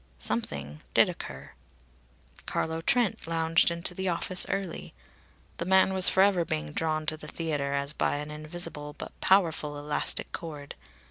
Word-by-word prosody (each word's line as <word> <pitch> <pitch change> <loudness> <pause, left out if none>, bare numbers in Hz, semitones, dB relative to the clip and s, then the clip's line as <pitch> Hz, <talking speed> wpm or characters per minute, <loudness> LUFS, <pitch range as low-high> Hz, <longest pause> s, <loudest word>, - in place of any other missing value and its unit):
Something 75 - -3
did - - +6
occur. 65 0 -8 1.0
Carlo 160 0 -1
Trent 235 -2 +1
lounged 165 0 +3
into 170 +1 -1
the 190 +1 -2
office 180 +1 +1
early. 195 -4 -3 0.6
The 170 - -2
man 190 +1 +4
was 190 0 +8
forever 190 -2 +4
being 75 - -3
drawn 155 - -1
to 155 +1 -1
the - - -9
theatre 145 -4 -2
as 140 +1 -1
by - - 0
an 150 +1 -4
invisible 150 -1 -6
but - - -8
powerful 160 -6 +2
elastic 145 0 -2
cord. 150 -4 -7
160 Hz, 145 wpm, -28 LUFS, 145-175 Hz, 1.0 s, was